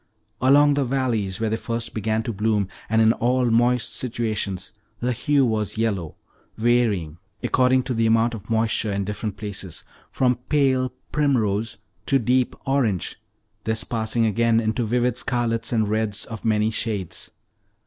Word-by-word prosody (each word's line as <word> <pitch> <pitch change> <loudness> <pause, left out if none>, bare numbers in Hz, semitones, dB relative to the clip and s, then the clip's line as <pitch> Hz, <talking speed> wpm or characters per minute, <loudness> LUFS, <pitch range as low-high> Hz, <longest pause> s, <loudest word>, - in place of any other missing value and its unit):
Along 145 +3 +5
the 140 0 +1
valleys, 120 -7 -1
where 110 -1 -1
they 110 - 0
first 115 0 -3
began 110 +1 -1
to 115 - -3
bloom, 105 -1 +1 0.2
and 110 +1 +4
in 110 +1 +5
all 125 0 +1
moist 120 +1 +2
situations, 110 -6 -3 0.3
the 125 +1 0
hue 140 +3 +2
was 110 -2 -1
yellow, 100 -8 -1 0.4
varying, 110 -9 +1 0.2
according 130 0 +3
to 125 - -3
the 115 -1 +2
amount 115 +1 +3
of 105 -2 -9
moisture 110 -1 +1
in 100 0 -1
different 105 +1 -4
places, 100 -4 -6 0.3
from 125 -2 +2
pale 130 -3 +2 0.2
primrose 115 -7 +1 0.3
to 135 - +4
deep 125 +1 +1
orange, 130 -9 0 0.5
this 110 0 0
passing 115 0 0
again 115 +1 +2
into 110 +1 0
vivid 125 +1 +1
scarlet 120 -2 -1
and 110 -3 +1
reds 110 -1 0
of 115 -2 -8
many 110 -1 +2
shades. 105 -5 -3
115 Hz, 150 wpm, -23 LUFS, 110-125 Hz, 0.5 s, Along